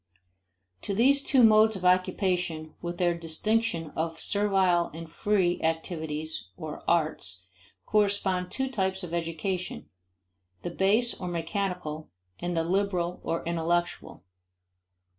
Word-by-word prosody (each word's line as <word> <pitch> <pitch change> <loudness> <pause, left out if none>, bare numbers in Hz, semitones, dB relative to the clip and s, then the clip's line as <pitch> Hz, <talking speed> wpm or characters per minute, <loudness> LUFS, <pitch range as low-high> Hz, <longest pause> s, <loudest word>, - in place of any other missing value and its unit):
To 200 - -2
these 275 +6 +5
two 270 -2 +4
modes 220 0 +6
of 185 -1 -5
occupation, 180 -3 +1
with 175 0 -4
their 175 -1 +2
distinction 170 +1 -1
of 165 0 -2
servile 190 -4 +2
and 165 0 -7
free 180 +1 +1
activities 160 - -3
(or 155 -1 -7
"arts") 150 - 0 0.4
correspond 200 -3 +1
two 265 +6 -1
types 190 -6 -1
of 170 -2 -6
education: 170 +2 -3 0.7
the 175 - -3
base 210 +7 +3
or 180 - -6
mechanical 175 -2 -3 0.3
and 175 -1 -2
the 165 - +2
liberal 180 -1 0
or 165 - -2
intellectual. 170 - -1
175 Hz, 120 wpm, -28 LUFS, 165-200 Hz, 0.7 s, modes